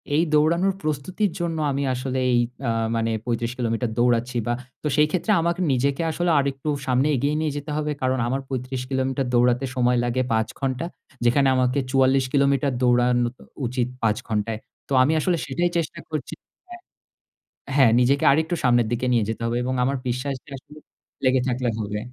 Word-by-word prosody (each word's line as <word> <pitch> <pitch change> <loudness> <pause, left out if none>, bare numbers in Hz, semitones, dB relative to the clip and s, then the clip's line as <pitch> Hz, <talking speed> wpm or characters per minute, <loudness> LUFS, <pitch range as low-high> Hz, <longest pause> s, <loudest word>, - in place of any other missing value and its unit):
এই 160 - +4
দৌড়ানোর 170 +6 +3
প্রস্তুতির 155 +7 -1
জন্য 170 -1 -2
আমি 140 +1 -1
আসলে 130 +1 -3
এই 120 - +4 0.3
আ - - +1 0.3
মানে 115 0 0
৩৫ 120 -1 -1
কিলোমিটার 115 -1 -1
দৌড়াচ্ছি 120 0 +1
বা 120 - +1 0.3
তো 150 - 0
সেইক্ষেত্রে 160 +7 +2
আমাকে 170 +2 0
নিজেকে 135 +3 +1
আসলে 175 +2 -1
আরেকটু 140 +1 -2 0.2
সামনে 130 +3 +2
এগিয়ে 140 +4 0
নিয়ে 155 -1 0
যেতে 145 +1 -6
হবে। 150 0 -1
কারণ 130 0 +1
আমার 135 +3 -1
৩৫ 130 0 -4
কিলোমিটার 130 0 -1
দৌড়াতে 125 +2 +3
সময় 125 -1 +2
লাগে 120 +1 0
৫ 110 0 +1
ঘন্টা। 135 +3 -2 0.4
যেখানে 135 +3 +4
আমাকে 130 +1 +2
৪৪ 135 0 +3
কিলোমিটার 140 -1 +2
দৌড়ানো 125 0 +3
উ - - -2 0.4
উচিত 125 0 -1
৫ 105 -2 +2
ঘন্টায়। 110 0 -1 0.3
তো - - -2
আমি 145 +5 +2
আসলে 175 +2 +1
সেটাই 175 +6 0
চেষ্টা 170 +1 -3
করছি 155 -3 -4 0.3
হ্যাঁ। 355 0 -11 0.9
হ্যাঁ, 135 -5 +6
নিজেকে 135 +3 +2
আরেকটু 160 +4 +1
সামনের 120 -3 +3
দিকে 120 +1 -1
নিয়ে 115 -3 +3
যেতে 115 - -4
হবে 115 +1 0
এবং 130 +1 -1
আমার 135 +2 0
বিশ্বাসটা 130 +3 -3
আসলে 150 +3 -16 0.5
লেগে 130 0 +3
থাকলে 125 0 0
হবে। 105 -1 -3
130 Hz, 175 wpm, -23 LUFS, 120-145 Hz, 0.9 s, হ্যাঁ